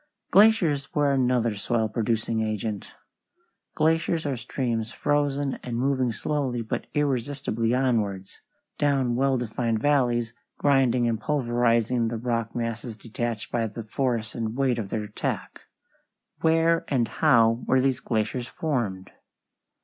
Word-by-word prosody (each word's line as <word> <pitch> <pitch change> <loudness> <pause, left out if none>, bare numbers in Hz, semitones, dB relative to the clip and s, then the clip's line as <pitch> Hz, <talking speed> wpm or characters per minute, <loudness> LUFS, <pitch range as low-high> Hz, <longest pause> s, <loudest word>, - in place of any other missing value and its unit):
Glaciers 185 -10 +4
were 145 -2 +3
another 125 -4 +2
soil 110 +2 0
producing 110 0 -1
agent. 110 -1 -3 0.8
Glaciers 160 +1 +1
are 140 -2 -1
streams 115 -2 -3
"frozen 145 -1 0
and 120 -2 -4
moving 130 -1 +1
slowly 130 0 -2
but 110 - -4
irresistibly 130 -4 0
onwards, 105 -7 -1 0.4
down 135 -4 +2
well 135 +1 +2
defined 115 -1 -1
valleys, 120 -4 +1 0.2
grinding 130 -4 +3
and 115 -2 -1
pulverizing 120 -3 +1
the 115 0 -3
rock 115 -1 -2
masses 115 -1 -4
detached 115 -1 -4
by 115 -1 0
the 110 +2 -7
force 115 0 -2
and 115 -1 -3
weight 130 -3 +1
of 100 -3 -4
their 110 +1 -2
attack." 105 0 -4 0.8
Where 165 +1 +3
and 125 -5 +1
how 115 -6 +3
were 130 - +4
these 130 0 +1
glaciers 115 +2 -2
formed? 115 - -3
120 Hz, 125 wpm, -26 LUFS, 115-135 Hz, 0.8 s, Glaciers